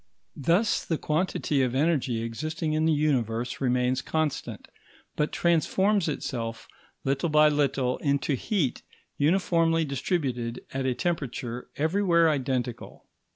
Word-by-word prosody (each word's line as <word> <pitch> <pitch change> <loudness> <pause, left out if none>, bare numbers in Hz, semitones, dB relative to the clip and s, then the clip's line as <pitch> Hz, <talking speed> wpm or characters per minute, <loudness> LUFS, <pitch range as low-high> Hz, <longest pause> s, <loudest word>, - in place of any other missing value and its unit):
Thus 175 - +2
the 165 - -1
quantity 155 -2 0
of 130 -1 0
energy 135 -6 +1
existing 155 +7 -3
in 155 +1 +1
the 160 - +3
Universe 125 -6 0
remains 125 0 +1
constant, 155 0 -2 0.5
but 150 - 0
transforms 185 +3 +2
itself 115 -6 -4 0.4
little 140 +5 0
by 150 0 +6
little 135 -3 +1
into 140 -1 0
heat 140 - -1 0.4
uniformly 165 0 +2
distributed 130 -4 -2
at 135 0 -1
a 125 - 0
temperature 125 -8 -3
everywhere 170 0 +3
identical. 130 -4 -3
145 Hz, 115 wpm, -27 LUFS, 125-165 Hz, 0.5 s, by